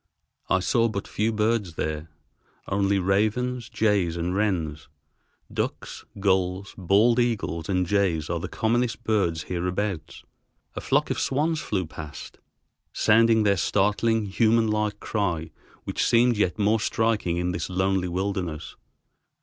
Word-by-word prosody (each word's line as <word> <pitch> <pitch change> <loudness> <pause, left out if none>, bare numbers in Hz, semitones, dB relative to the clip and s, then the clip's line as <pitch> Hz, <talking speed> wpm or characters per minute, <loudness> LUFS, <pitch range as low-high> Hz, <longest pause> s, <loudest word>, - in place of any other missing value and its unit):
I 95 - +3
saw 115 +5 +2
but 100 -2 -4
few 110 +2 0
birds 105 -5 0
there, 80 +1 -3 0.6
only 100 0 +1
ravens, 110 +6 0
jays, 100 -6 +1
and 85 +1 -2
wrens. 85 -8 -1 0.7
Ducks, - - -4
gulls, 95 0 0
bald 105 +6 +3
eagles, 105 -9 -1
and 90 -1 +1
jays 90 -5 +1
are - - -2
the - - -4
commonest 115 +1 -1
birds 95 -8 0
hereabouts. 90 -1 -3 0.5
A - - -4
flock - - +1
of - - -1
swans 155 +4 0
flew 95 -4 -2
past, 75 -1 -9 0.5
sounding 110 0 +4
their 100 -2 +3
startling 105 +4 +1
human 110 +3 +2
like 105 -1 -1
cry 85 -7 -2 0.3
which - - -2
seemed 120 +1 +4
yet 105 -1 0
more 105 +1 +2
striking 110 -6 0
in 90 0 0
this 85 -1 -4
lonely 95 0 0
wilderness. 90 -3 -3
100 Hz, 135 wpm, -25 LUFS, 90-110 Hz, 0.7 s, sounding